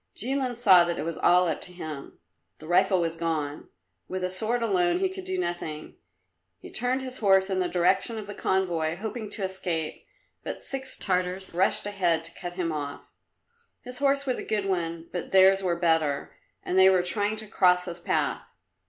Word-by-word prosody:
Jilin 255 +2 -1
saw 190 -7 +7
that 170 0 -2
it 150 - -3
was 165 -1 -4
all 180 +1 +4
up 160 - -1
with 180 - -10
him. 155 -5 -7 0.4
The 155 - -12
rifle 180 +2 +3
was 165 -1 -1
gone; 155 -3 -3 0.4
with 185 0 -4
a 185 - 0
sword 225 +5 0
alone 180 -5 +2
he 380 +1 +1
could 380 0 -8
do 375 0 -2
nothing. 160 - -4 0.6
He - - -12
turned 255 +2 -1
his 255 0 -6
horse 195 -2 +4
in 190 - 0
the 180 - +1
direction 185 +6 +1
of 215 - -5
the 205 - -7
convoy, 170 -5 0
hoping 220 +3 -5
to 200 - -4
escape, 180 -4 -3 0.4
but - - -6
six 265 -1 -4
Tartars 185 0 -1
rushed 185 +4 +2
ahead 180 -6 0
to - - -8
cut 175 -1 -7
him 175 -2 -2
off. 145 -2 -6 0.7
His 250 0 -6
horse 280 0 +2
was 255 -2 -1
a - - -5
good 210 -2 -1
one, 170 -3 -2
but 175 - -5
theirs 195 0 +6
were 175 -3 0
better, 160 -4 +1 0.3
and 185 - +1
they 190 0 +8
were 185 -2 +3
trying 205 +4 0
to 215 - -7
cross 180 -2 +3
his 175 0 -6
path. - - 0
185 Hz, 195 wpm, -27 LUFS, 170-210 Hz, 0.7 s, they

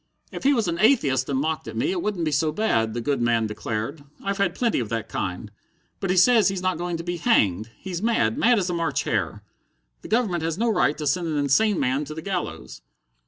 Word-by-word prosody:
"If - - -6
he 280 - +5
was 225 -5 0
an 170 0 -2
atheist 145 - +3
and 135 - 0
mocked 155 +3 -2
at - - -7
me 115 - +1
it 185 -2 -2
wouldn't 195 -5 -2
be 155 - 0
so 155 +2 +1
bad," 115 - 0
the 120 - -2
good 140 0 -1
man 115 -1 +2
declared. 110 +6 -4 0.2
"I've 195 0 -2
had 180 -3 +1
plenty 235 - +1
of 115 -4 -3
that 115 -1 -3
kind. 95 +3 -4 0.5
But 195 - -3
he 185 - +1
says 225 +3 +6
he's 195 -2 -2
not 185 0 0
going 175 -1 -2
to 165 - -6
be 175 0 -3
hanged. 110 - +2
He's 180 -2 -5
mad, 220 - +1
mad 240 0 +4
as 185 -3 0
a - - -2
March 170 -1 -1
hare. - - -2 0.6
The - - -9
Government 215 -7 +1
has 165 +1 -2
no 230 +2 +1
right 150 -9 +2
to 150 - -4
send 170 +4 0
an 155 -2 -1
insane 160 +8 +2
man 135 +2 0
to 155 - -8
the 160 - -7
gallows." 80 - -5
165 Hz, 240 wpm, -24 LUFS, 130-195 Hz, 0.6 s, says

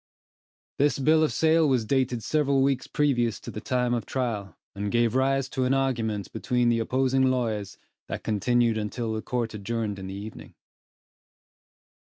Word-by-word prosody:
This 145 +1 +3
bill 155 +3 +4
of 155 - +2
sale 160 -1 +3
was 125 -4 +1
dated 125 -1 0
several 140 -1 +2
weeks 135 -1 0
previous 120 -7 +1
to - - -7
the 105 - -6
time 125 0 0
of 120 - -1
trial, 115 -7 -3 0.2
and 100 0 -3
gave 120 -1 +2
rise 135 +1 +1
to 130 - -1
an 130 +2 +2
argument 115 -7 -1
between 120 +3 +1
the 115 -1 +2
opposing 130 +3 +2
lawyers 110 -6 -2 0.3
that - - -5
continued 115 +1 +1
until 110 +2 -3
the 110 - -3
court 120 -2 -2
adjourned 105 -1 -3
in 95 - -6
the 95 - -6
evening. 105 +2 -9
120 Hz, 165 wpm, -26 LUFS, 110-135 Hz, 0.3 s, bill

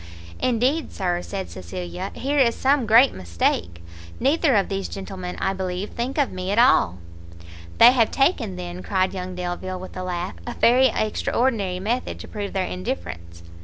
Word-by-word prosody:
"Indeed, 255 +6 +1
Sir," 175 -2 -1
said 190 +1 -6
Cecilia, 90 -1 -6
"here 285 +2 0
is 235 -3 +4
some 270 -3 +2
great 235 +5 +6
mistake; 85 -1 -2 0.4
neither 280 0 +3
of 200 - +3
these 195 -1 -3
gentlemen, 190 -2 -6
I 195 - 0
believe, 185 +1 -4
think 250 +5 -3
of 285 -3 +2
me 185 0 -4
at 205 - 0
all." 235 - +4 0.8
"They 235 - +9
have 235 -4 +3
taken, 270 - +1
then," 180 0 -6
cried 190 -1 0
young 185 -1 -5
Delvile 180 +1 -4
with 185 - -10
a 185 - -4
laugh, 180 0 -3
"a 240 - -4
very 255 +3 +5
extraordinary 215 -3 0
method 230 +6 -2
to - - -9
prove 205 -2 -5
their 190 -1 0
indifference!" 85 -1 -6
195 Hz, 165 wpm, -23 LUFS, 180-240 Hz, 0.8 s, They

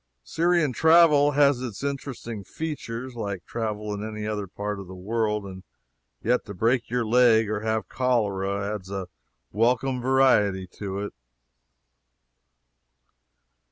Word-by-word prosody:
Syrian 165 - +1
travel 160 -2 +5
has 140 -2 +4
its 120 -2 -6
interesting 130 -6 -4
features, 130 -4 -5
like 100 -6 -5
travel 105 -2 -3
in 105 0 -5
any 105 -1 -5
other 105 -2 -3
part 100 +2 -4
of 95 - -9
the 95 - -9
world, 105 +2 -1
and 95 -1 -8 0.6
yet 125 +2 +2
to 100 -2 -8
break 115 +5 +1
your 120 0 0
leg 115 -1 +4
or 110 - -1
have 110 0 -1
the - - -21
cholera 100 -5 0
adds 95 -3 -7
a 95 -2 -5 0.4
welcome 125 +4 +1
variety 120 -7 +3
to 95 +1 -6
it. 105 - -5
110 Hz, 135 wpm, -25 LUFS, 100-130 Hz, 0.6 s, travel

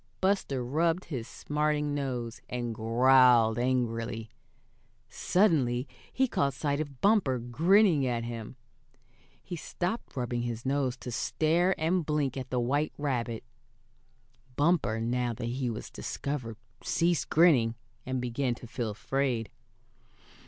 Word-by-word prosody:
Buster 185 -10 0
rubbed 165 +7 +1
his 125 -7 -5
smarting 150 +1 -1
nose, 125 -5 -3
and 120 -2 -3
growled 120 0 +5
angrily. 115 -3 -1 0.8
Suddenly 140 - +2 0.2
he 265 0 +2
caught 140 - 0
sight 140 +2 -1
of 145 -4 -5
Bumper 200 - +3
grinning 155 - +3
at 120 -2 -1
him. 115 0 -6 0.9
He 180 - -6
stopped 175 +3 -4
rubbing 120 -1 -1
his 120 0 -4
nose 135 -2 0
to 125 - -7
stare 170 +9 +1
and 170 +3 +1
blink 150 -4 0
at 130 -2 -5
the 125 - 0
white 140 +5 0
rabbit. 125 -6 -2 1.1
Bumper, 145 -8 +2
now 120 +1 0
that 115 +1 -5
he 125 +1 -2
was 110 - -6
discovered, 115 - -4 0.2
ceased 170 -3 +1
grinning, 135 -9 +4 0.3
and 130 0 -2
began 125 +1 -1
to 120 - -11
feel 120 -1 -3
afraid. 120 +2 -1
130 Hz, 125 wpm, -29 LUFS, 120-150 Hz, 1.1 s, growled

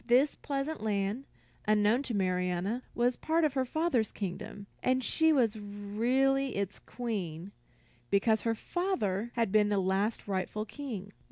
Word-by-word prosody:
This 260 +4 +5
pleasant 280 +1 -3
land, 210 +4 -1 0.4
unknown 215 +3 +4
to 230 - -1
Marianna, 185 +3 0
was 245 +1 +2
part 325 +1 +1
of 300 -3 +2
her 265 -2 +1
father's 270 -6 +1
kingdom, 200 +1 -5 0.2
and 255 0 +2
she 320 +4 +3
was 235 -7 +2
really 235 +7 +1
its 200 0 -2
queen 195 -7 -4 0.6
because 220 +2 +3
her 230 -1 0
father 235 - -1
had 230 -5 +1
been 210 0 +4
the 205 - +2
last 195 +4 0
rightful 200 +2 -2
king. 220 -6 -6
220 Hz, 145 wpm, -31 LUFS, 200-260 Hz, 0.6 s, This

